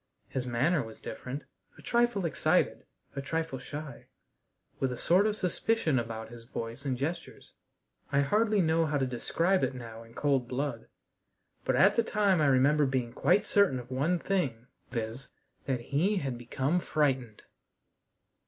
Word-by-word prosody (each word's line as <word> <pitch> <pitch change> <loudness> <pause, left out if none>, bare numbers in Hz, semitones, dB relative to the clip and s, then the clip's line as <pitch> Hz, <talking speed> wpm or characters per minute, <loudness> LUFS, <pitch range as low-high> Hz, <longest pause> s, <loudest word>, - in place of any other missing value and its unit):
His 125 -1 -3
manner 140 +7 +2
was 110 -2 -9
different 130 +3 -6 0.3
a - - -15
trifle 235 -5 +2
excited, 160 - +1 0.3
a 140 - -2
trifle 160 -2 -2
shy, 145 +1 -8 0.7
with 135 -1 0
a 125 - -4
sort 185 - +4
of 210 - 0
suspicion 180 - +1
about 115 -1 -5
his 120 0 -11
voice 115 +3 -6
and 130 -2 0
gestures. 160 +6 -5 0.6
I 140 0 +4
hardly 210 +7 +2
know 160 0 +2
how 150 -1 0
to 135 - +1
describe 165 +9 +1
it 130 - 0
now 115 -2 -8
in 115 0 -15
cold 135 -4 +1
blood, 125 -2 -3 0.8
but - - +2
at 200 +3 +5
the 230 - +4
time 205 -6 +2
I 150 - +4
remember 140 +2 +4
being 125 -3 -1
quite 200 +4 +3
certain 200 -12 +3
of 125 +1 -8
one 150 +8 +1
thing, 140 -12 -1 0.2
viz., 115 +2 -4 0.4
that 130 -3 0
he 155 - +1
had 135 -7 -2
become 130 +7 -1
frightened! 135 -9 0
140 Hz, 160 wpm, -30 LUFS, 125-175 Hz, 0.8 s, at